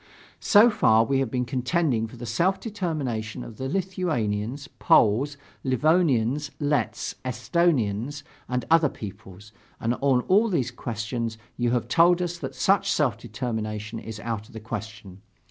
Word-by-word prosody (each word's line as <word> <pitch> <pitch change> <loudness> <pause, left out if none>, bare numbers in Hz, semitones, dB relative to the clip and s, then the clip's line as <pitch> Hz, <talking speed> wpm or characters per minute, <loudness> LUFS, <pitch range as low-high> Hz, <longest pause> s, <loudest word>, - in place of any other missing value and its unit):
"So 220 +3 +6
far 115 - +4
we 135 +3 +1
have 135 -3 0
been 125 +1 -1
contending 125 -1 0
for 120 - -13
the 120 - -7
self 170 - +1
determination 140 - -3
of 115 - -10
the 130 0 -3
Lithuanians, 140 - -2
Poles, 135 +8 +3 0.3
Livonians, 145 -1 +2
Letts, 125 -7 -1
Esthonians, 130 - 0 0.3
and 125 -2 -1
other 165 -3 +5
peoples; 100 -1 -10 0.3
and 115 +1 0
on 135 -3 +3
all 205 - +3
these 130 - -1
issues 115 0 -3 0.2
you 120 -1 0
have 120 -1 0
told 170 +6 +5
us 175 -1 -3
that - - -6
such 200 0 +2
self 140 - +2
determination 110 -2 -4
is 110 -1 -8
out 110 -2 -4
of - - -18
the 110 - -6
question. 105 -3 -7
125 Hz, 145 wpm, -25 LUFS, 110-160 Hz, 0.3 s, So